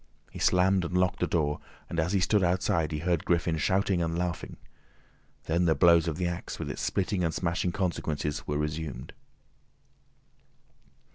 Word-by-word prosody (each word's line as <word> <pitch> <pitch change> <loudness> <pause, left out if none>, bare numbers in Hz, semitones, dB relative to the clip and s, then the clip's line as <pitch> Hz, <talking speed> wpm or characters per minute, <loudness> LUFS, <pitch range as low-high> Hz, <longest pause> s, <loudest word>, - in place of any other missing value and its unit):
He - - -9
slammed 95 +1 +3
and 90 +1 -1
locked 90 0 +1
the 90 - +1
door, 75 -4 0 0.3
and 85 - -3
as 80 +3 +1
he 100 - +2
stood 100 +2 +3
outside 85 -3 +1
he 75 - -2
heard 85 +1 0
Griffin 85 -1 +1
shouting 95 +2 +1
and 85 0 -1
laughing. 90 -1 -3 0.9
Then 85 +2 +1
the 80 -2 +3
blows 85 +2 +5
of 80 -2 -2
the 90 - -1
axe 85 -1 -4
with - - -4
its - - -6
splitting 95 -1 0
and 80 - +1
smashing 85 +2 -1
consequences, 80 -5 -2
were 75 - -1
resumed. 75 -4 -4
85 Hz, 165 wpm, -28 LUFS, 80-90 Hz, 0.9 s, blows